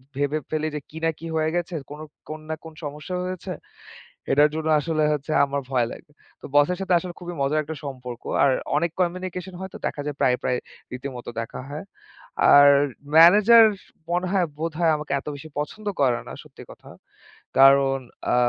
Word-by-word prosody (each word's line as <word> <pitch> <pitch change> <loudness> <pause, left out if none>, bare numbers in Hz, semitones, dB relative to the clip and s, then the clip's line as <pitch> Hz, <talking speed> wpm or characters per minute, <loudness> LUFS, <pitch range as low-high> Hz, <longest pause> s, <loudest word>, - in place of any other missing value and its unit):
ভেবে 145 +2 0
ফেলি 155 0 -1
যে - - -2
কি 160 - -11
না 165 - +3
কি 165 - -9
হয়ে 155 0 +1
গেছে, 175 0 -2 0.2
কোনো 150 +1 -8 0.3
কোন 155 0 -5
না 160 - -1
কোন 160 - -10
সমস্যা 150 +5 -6
হয়েছে। 185 0 -5 0.8
এটার 145 +2 +5
জন্য 160 0 -3
আসলে 155 +1 -1
হচ্ছে 150 +1 -4
আমার 140 0 -3
ভয় 120 -3 +2
লাগে।” - - -12 0.3
তো - - -9
বসের 145 +5 +4
সাথে 190 -1 0
আসলে 175 0 -7
খুবই 175 0 -7
মজার 145 +3 +1
একটা 160 +2 -6
সম্পর্ক। 125 -3 -7 0.2
আর 140 - +5 0.3
অনেক 170 +1 0
কমিউনিকেশন 180 +1 -2
হয়। 190 - -6
তো - - -7
দেখা 145 - -5
যায়, 150 -1 -4
প্রায়, 125 -1 +4
প্রায় 125 - +1 0.3
রীতিমতো 125 -1 -7
দেখা 115 - -7
হয়। 150 +2 -6 0.7
আর 145 0 +9 0.5
ম্যানেজার 210 +8 +8 0.5
মনে 180 +1 0
হয় 190 -3 +2
বোধহয় 165 0 +1
আমাকে 150 -1 -7
এত 135 - -15
বেশি 155 +3 -10
পছন্দ 210 +8 -6 0.2
করে 125 -3 +3
না, - - -8
সত্যি - - -14
কথা। - - -15 0.7
কারণ 135 0 +6 0.3
আ - - +3
155 Hz, 180 wpm, -24 LUFS, 140-175 Hz, 0.8 s, আর